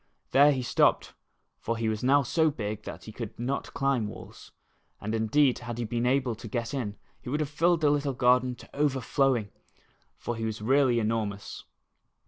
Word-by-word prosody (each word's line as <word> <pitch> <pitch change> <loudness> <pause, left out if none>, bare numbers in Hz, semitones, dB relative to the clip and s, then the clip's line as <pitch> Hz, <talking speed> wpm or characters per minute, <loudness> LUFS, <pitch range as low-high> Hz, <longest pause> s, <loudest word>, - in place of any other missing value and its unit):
There 145 +2 +6
he 130 -3 -1
stopped, - - +2 0.5
for 115 0 -2
he 115 0 -1
was 110 +1 -2
now 140 +2 +4
so 160 +5 +2
big 105 -6 -5
that - - -8
he 110 - -9
could 115 -1 -7
not 130 +4 -3
climb 135 -6 +1
walls, - - -11 0.5
and 110 +2 -4
indeed 125 +5 +2
had 120 -1 -6
he 120 - -2
been 120 +2 -1
able 130 -2 +1
to 115 - -9
get 115 +3 -3
in 115 -7 -3 0.3
he - - -8
would 150 +4 -1
have 150 -2 -1
filled 165 +2 +2
the 150 -2 +4
little 145 -1 0
garden 125 0 +3
to - - -16
overflowing, 135 -5 +1 0.7
for 120 - -4
he 115 - -5
was 110 -1 -3
really 130 +2 +3
enormous. 110 -2 -2
125 Hz, 185 wpm, -28 LUFS, 110-140 Hz, 0.7 s, There